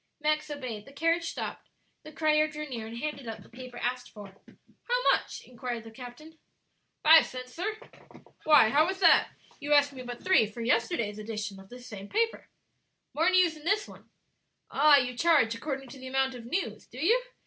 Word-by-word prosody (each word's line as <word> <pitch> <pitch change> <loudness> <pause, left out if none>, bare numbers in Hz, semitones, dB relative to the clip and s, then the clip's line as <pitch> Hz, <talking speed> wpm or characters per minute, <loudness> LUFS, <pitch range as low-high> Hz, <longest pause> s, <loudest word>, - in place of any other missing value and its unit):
Max 305 0 0
obeyed; 255 -8 -6
the - - -12
carriage 330 +3 0
stopped, - - -6 0.3
the 310 - -12
crier 305 0 +2
drew 300 0 -7
near 230 -5 -6
and 230 +1 -8
handed 280 -1 -5
up 225 - -7
the - - -18
paper 250 0 -10
asked 245 0 -3
for. 200 -3 -12 0.5
"How - - +1
much?" - - -2
inquired 245 -2 -6
the 225 - -12
captain. 260 +7 -12 0.6
"Five 320 +1 +8
cents, 255 0 -9
sir." 425 +5 -3 0.7
"Why, 300 -8 +6
how 305 +8 +3
is 380 0 -4
that? 340 - +6 0.3
You 295 +1 0
asked 285 -1 +4
me 260 - -8
but 245 -1 -8
three 370 - +4
for 215 +3 -9
yesterday's 230 - 0
edition 210 -2 -5
of 195 0 -15
this 245 0 -12
same 205 -3 -9
paper." 455 +1 -1 0.6
"More 325 +4 +2
news 365 -3 +3
in 305 - -14
this 405 +4 0
one." - - -15 0.6
"Ah, 290 +1 +6
you 250 -2 -1
charge 285 -6 +3
according 270 +2 -5
to 265 - -11
the 260 - -9
amount 265 0 0
of 240 -2 -10
news, 240 - -3
do 245 - -14
you?" 435 - +3
270 Hz, 190 wpm, -28 LUFS, 235-310 Hz, 0.7 s, Five